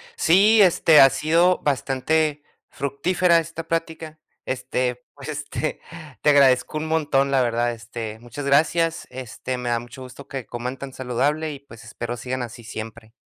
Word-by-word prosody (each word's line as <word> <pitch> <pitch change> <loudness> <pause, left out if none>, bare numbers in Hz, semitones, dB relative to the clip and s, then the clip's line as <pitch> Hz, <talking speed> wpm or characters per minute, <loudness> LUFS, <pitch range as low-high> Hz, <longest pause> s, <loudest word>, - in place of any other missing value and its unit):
Sí, 210 - +5
este, 165 -4 +5
ha 135 - +9
sido 165 +6 +2
bastante 145 +2 0 0.3
fructífera 170 +6 +1
esta 165 0 -6
plática, 160 -1 -4 0.3
este, 125 -1 -2
pues, 145 +1 -10
este, 145 +1 -4 0.4
te 150 - +3
agradezco 140 +1 +4
un 160 - -4
montón, 145 -4 +1
la 135 -1 +2
verdad, 120 0 0
este, 115 -1 -7
muchas 130 +4 -8
gracias, 160 +4 +2
este, 130 0 -6
me 125 -1 -4
da 120 0 +1
mucho 120 +3 -11
gusto 130 +2 -11
que 135 -3 -6
coman 125 +2 -5
tan 140 -1 -8
saludable 145 +5 -1
y, 140 - -9
pues, 115 -6 -15
espero 120 +3 -6
sigan 130 +1 -4
así 120 0 -8
siempre. 110 0 -9
140 Hz, 160 wpm, -23 LUFS, 125-155 Hz, 0.4 s, ha